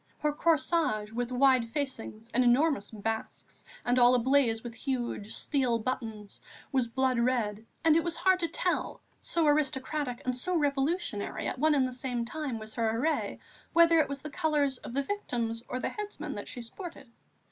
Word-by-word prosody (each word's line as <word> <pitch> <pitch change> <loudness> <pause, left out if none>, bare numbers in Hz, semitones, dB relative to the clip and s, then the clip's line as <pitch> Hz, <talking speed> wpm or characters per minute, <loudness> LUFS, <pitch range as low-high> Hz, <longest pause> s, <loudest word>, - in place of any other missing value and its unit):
Her 300 -1 0
corsage, 305 -9 +1
with 240 +2 -3
wide 255 -2 +4
facings 230 -4 -4
and 255 - +4
enormous 250 -2 +3
basques 220 +1 -5 0.2
and 245 +1 +3
all 245 +1 +7
ablaze 245 -2 +3
with 240 -1 -6
huge 240 -5 -3
steel 260 -5 +1
buttons, 225 -4 -5 0.3
was 260 -4 +2
blood 255 +1 +1
red, 230 -3 0 0.2
and 320 -1 +6
it 330 - +3
was 345 -1 -1
hard 375 -1 +3
to 335 - 0
tell, - - -2 0.2
so 335 -2 0
aristocratic 290 -2 0
and 255 -1 0
so 355 +9 -1
revolutionary 285 - -1
at - - -3
one 310 +1 +4
and 265 -2 +3
the 255 - -6
same 245 -2 -2
time 285 -2 -4
was 220 0 -8
her 225 -1 0
array, 310 +6 0 0.4
whether 335 -1 +6
it 310 - +2
was 280 -1 -4
the 300 - -6
colours 290 -5 +1
of 240 - -8
the 280 - +1
victims 235 - -2
or - - -5
of 255 - -3
the - - +1
headsman 420 -1 -6
that - - -6
she 245 - -6
sported. 325 - -9
255 Hz, 180 wpm, -30 LUFS, 235-300 Hz, 0.4 s, all